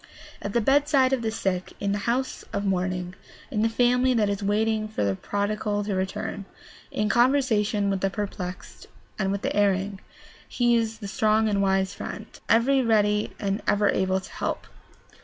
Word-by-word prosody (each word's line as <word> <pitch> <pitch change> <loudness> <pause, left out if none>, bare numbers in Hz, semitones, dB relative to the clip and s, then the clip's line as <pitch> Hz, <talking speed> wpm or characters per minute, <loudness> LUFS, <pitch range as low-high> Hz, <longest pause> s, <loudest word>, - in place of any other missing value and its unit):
At 200 - -4
the 235 - +2
bedside 275 +1 +3
of 260 - +1
the 225 - -1
sick, 190 -4 -2
in 200 -1 -1
the 205 - 0
house 260 +2 -1
of 200 -1 -1
mourning, 180 -1 -1 0.4
in 210 -5 0
the 225 - +3
family 250 +2 +3
that 210 -3 +2
is 200 0 -2
waiting 215 +2 +1
for 215 - -2
the 100 -1 +1
prodigal 205 - -2
to 205 0 -2
return, 190 +1 -3 0.4
in 210 - -1
conversation 230 -4 +2
with 195 -1 -2
the 195 - +2
perplexed 190 -3 -6 0.3
and 195 -1 +1
with 200 0 -3
the - - -1
erring, 200 -1 +1 0.5
he 240 -1 +2
is 225 -1 0
the 210 -2 -7
strong 215 +2 +2
and 200 -2 +1
wise 190 -1 +1
friend, - - -6 0.2
every 260 +4 +4
ready 210 -3 +2
and 200 +1 -1
ever 205 0 +3
able 190 0 +1
to 190 - -12
help. - - -3
210 Hz, 175 wpm, -25 LUFS, 195-225 Hz, 0.5 s, every